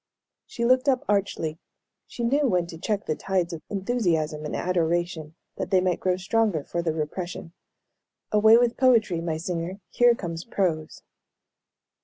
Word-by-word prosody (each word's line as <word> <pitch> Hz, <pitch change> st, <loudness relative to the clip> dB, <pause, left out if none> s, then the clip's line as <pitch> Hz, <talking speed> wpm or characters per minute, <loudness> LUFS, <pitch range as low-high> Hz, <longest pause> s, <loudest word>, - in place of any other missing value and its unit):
She 235 Hz, -, -3 dB
looked 255 Hz, +3 st, +4 dB
up 255 Hz, -2 st, +1 dB
archly. 180 Hz, -6 st, -1 dB, 0.5 s
She 240 Hz, -, -6 dB
knew 280 Hz, +4 st, +2 dB
when 180 Hz, -6 st, +1 dB
to 170 Hz, -1 st, -9 dB
check 210 Hz, +2 st, -2 dB
the 155 Hz, -, 0 dB
tides 185 Hz, -1 st, -1 dB
of 160 Hz, -, -6 dB
enthusiasm 175 Hz, -8 st, -1 dB
and 150 Hz, -, -4 dB
adoration, 170 Hz, -2 st, -1 dB, 0.2 s
that -, -, -3 dB
they 190 Hz, -, +4 dB
might 180 Hz, -1 st, 0 dB
grow 185 Hz, -1 st, 0 dB
stronger 195 Hz, -4 st, 0 dB
for 170 Hz, -, -3 dB
the 165 Hz, -1 st, 0 dB
repression. 165 Hz, +2 st, -5 dB, 0.8 s
"Away 220 Hz, +2 st, +6 dB
with 240 Hz, 0 st, +2 dB
poetry, 225 Hz, -10 st, +3 dB
my 165 Hz, -2 st, -2 dB
singer, 175 Hz, +3 st, -4 dB
here 240 Hz, -1 st, +4 dB
comes 170 Hz, -5 st, -5 dB
prose." 170 Hz, -8 st, -2 dB
180 Hz, 155 wpm, -25 LUFS, 165-220 Hz, 0.8 s, Away